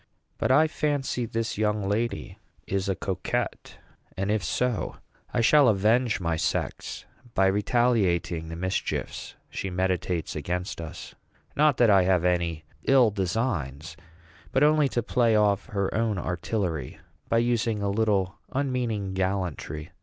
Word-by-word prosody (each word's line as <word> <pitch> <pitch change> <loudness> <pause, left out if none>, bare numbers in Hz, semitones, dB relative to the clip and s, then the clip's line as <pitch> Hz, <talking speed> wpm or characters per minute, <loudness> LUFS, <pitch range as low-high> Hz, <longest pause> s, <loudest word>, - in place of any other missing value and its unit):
But - - +1
I 150 +5 +5
fancy 145 -6 -1
this 115 -1 -3
young 105 -2 +1
lady 105 -1 -2 0.3
is 100 0 -1
a 95 - +1
coquette; 95 -1 -3 0.4
and 95 +2 0
if 105 -3 0
so, 125 -3 -1 0.4
I 120 - +1
shall 140 +4 +6
avenge 110 +3 +3
my 85 -3 -1
sex - - -2 0.3
by 95 - +4
retaliating 95 -5 +1
the 80 - -6
mischiefs 95 +2 -3 0.2
she 95 - -3
meditates 90 -2 -1
against 90 +4 -3
us. 80 - -8 0.4
Not 150 -3 +4
that 115 -3 +5
I 95 -1 +6
have 90 -1 +2
any 85 -3 0 0.2
ill 130 -5 +5
designs, 90 - -2 0.6
but 135 - +3
only 150 -1 +4
to 120 -1 -1
play 120 -1 +2
off 105 -1 +2
her 100 -2 -1
own 110 -2 0
artillery 90 - -2 0.3
by 115 - +3
using 115 -3 +1
a 100 - +1
little 100 -3 +1
unmeaning 120 -8 -1
gallantry. 95 -5 -2
100 Hz, 140 wpm, -26 LUFS, 90-115 Hz, 0.6 s, shall